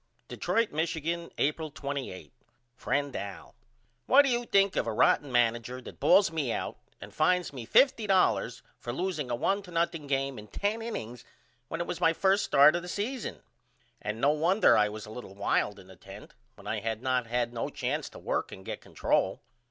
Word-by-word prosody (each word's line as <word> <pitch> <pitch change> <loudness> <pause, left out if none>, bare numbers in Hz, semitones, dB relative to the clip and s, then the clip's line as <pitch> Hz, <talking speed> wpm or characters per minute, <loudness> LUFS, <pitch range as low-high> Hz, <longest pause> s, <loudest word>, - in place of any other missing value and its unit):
Detroit, 230 -1 0
Michigan, 165 +2 -2
April 155 +2 0
28 140 - -6 0.4
FRIEND 140 +1 -1
AL: 100 -1 -7 0.5
What 280 +3 +7
do 275 - +1
you 240 0 0
think 195 -1 +3
of - - 0
a - - 0
rotten 135 +5 +3
manager 120 +1 +1
that 130 - -11
bawls 180 +5 +5
me 150 -7 -1
out - - -3 0.2
and - - -11
fines 180 +1 +1
me 120 -4 -7
$50.00 195 - +3 0.2
for 120 - -5
loosing 155 -2 -3
a 120 - 0
1 195 +11 0
to 185 -3 -13
0 170 0 +3 0.2
game 135 -3 -1
in 105 - -11
10 205 - -2
innings 125 - -6 0.4
when 165 - -5
it 170 - -1
was 170 - -5
my 165 - +4
1st 195 +4 +3
start 155 0 +5
this 180 0 -6
season? 235 +4 -4 0.6
And 105 +1 -4
no 140 +4 +4
wonder 170 +7 +4
I 105 0 +3
was 105 0 -7
a 105 - -11
little 110 -4 -9
wild 100 +1 0
in 95 - -13
the 95 -1 -15
10th - - -12 0.2
when - - -16
I - - -2
had 110 +1 -3
not 130 -2 0
had 120 0 -1
no 115 - -3
chance - - -3
to - - -13
work - - -2
and 95 - -10
get - - -5
control. - - 0
145 Hz, 190 wpm, -29 LUFS, 120-180 Hz, 0.6 s, What